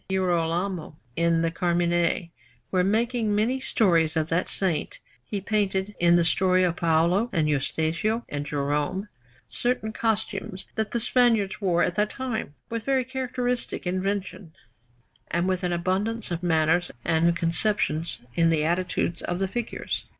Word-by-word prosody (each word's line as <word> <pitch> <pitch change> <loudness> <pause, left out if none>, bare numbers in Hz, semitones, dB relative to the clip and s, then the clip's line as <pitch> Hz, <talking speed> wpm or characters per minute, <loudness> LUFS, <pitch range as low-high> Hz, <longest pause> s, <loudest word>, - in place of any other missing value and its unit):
Girolamo 175 -2 -1 0.2
in 170 0 +2
the 165 - +1
Carmine, 175 0 +1 0.4
where, 185 -1 +3
making 220 +2 +1
many 235 +6 +1
stories 170 -10 +2
of 155 0 0
that 165 +2 0
Saint, 185 -5 -1 0.3
he 200 +10 -4
painted, 200 -1 0
in 175 0 +5
the 170 -1 +4
story 185 +2 +3
of 175 -1 +1
Paola 170 +7 +2
and 160 -4 +1
Eustachio 160 - 0
and 145 0 -3
Jerome, 145 +7 -1 0.4
certain 240 -3 -1
costumes 210 -4 -2
that 220 -1 -1
the 235 - -1
Spaniards 225 -4 +2
wore 175 -3 +2
at 180 - +1
that 210 +3 +1
time, 240 - -4
with 230 -1 -4
very 265 -1 +1
characteristic 250 -3 -2
invention, 185 -1 -3 0.8
and 175 +2 0
with 185 -1 0
an 180 - 0
abundance 190 +5 -1
of 170 -1 -2
manners 165 0 +2 0.2
and 170 +1 +3
conceptions 165 - 0
in 165 +3 +3
the 160 -2 +2
attitudes 175 0 0
of 175 - -2
the 195 +1 0
figures. 235 +4 -4
185 Hz, 145 wpm, -26 LUFS, 165-215 Hz, 0.8 s, in